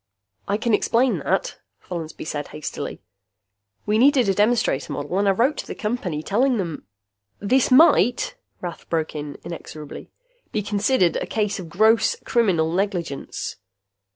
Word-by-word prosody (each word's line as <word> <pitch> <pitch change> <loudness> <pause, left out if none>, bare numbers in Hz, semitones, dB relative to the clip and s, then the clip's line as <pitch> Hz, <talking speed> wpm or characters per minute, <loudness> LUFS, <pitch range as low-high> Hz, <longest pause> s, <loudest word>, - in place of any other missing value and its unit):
"I 200 - +1
can 225 +1 0
explain 240 +4 +2
that," - - -1 0.2
Follansby 165 -4 -7
said 145 -2 -4
hastily. 150 - -6 0.8
"We 215 +1 +2
needed 265 -2 +5
a 195 - +3
demonstrator 210 - +1
model 145 +6 -2
and 200 - +2
I - - +6
wrote 245 +10 +2
to - - -5
the - - -6
Company, 195 -9 -3
telling 245 +7 +2
them 170 -6 -4 0.3
" 100 0 -51
"This 260 -1 +4
might," 320 - +5 0.3
Rath 175 -2 -7
broke 160 -2 -1
in 145 -2 -6
inexorably, 155 -3 -8 0.4
"be 215 - -1
considered 205 -2 +2
a - - -3
case 210 -2 -1
of 175 -3 -8
gross 220 - +3
criminal 185 -10 +2
negligence." 180 - -3
200 Hz, 150 wpm, -23 LUFS, 160-235 Hz, 0.8 s, I